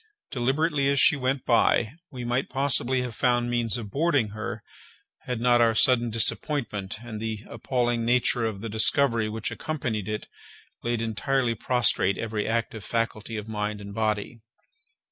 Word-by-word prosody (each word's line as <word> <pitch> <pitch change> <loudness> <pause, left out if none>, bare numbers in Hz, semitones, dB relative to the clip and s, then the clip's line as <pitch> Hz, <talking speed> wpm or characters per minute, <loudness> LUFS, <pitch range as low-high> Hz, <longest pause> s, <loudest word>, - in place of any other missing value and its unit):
Deliberately 140 +3 +1
as 140 0 +2
she 180 - +6
went 130 -1 -1
by, 115 -1 +3 0.2
we 125 -3 -6
might 120 +3 -1
possibly 130 -2 +2
have 125 -2 -5
found 120 +1 +1
means 120 -1 0
of 105 -4 -7
boarding 145 -7 +1
her, 110 +1 -6 0.6
had 125 -2 -2
not 120 0 +4
our 115 -1 +4
sudden 120 0 +4
disappointment 110 -2 0
and 110 -3 -7
the 110 -1 -4
appalling 120 0 -1
nature 120 0 +2
of 100 -3 -5
the 115 - -4
discovery 115 +1 +2
which 110 0 -3
accompanied 120 -10 -3
it 105 0 -3 0.6
laid 120 -1 -1
entirely 120 +2 0
prostrate 115 -4 +1
every 110 -2 -3
active 115 -2 -2
faculty 115 0 -2
of 105 0 -6
mind 105 -1 -3
and 100 0 -9
body. 110 +1 -2
115 Hz, 155 wpm, -26 LUFS, 110-125 Hz, 0.6 s, she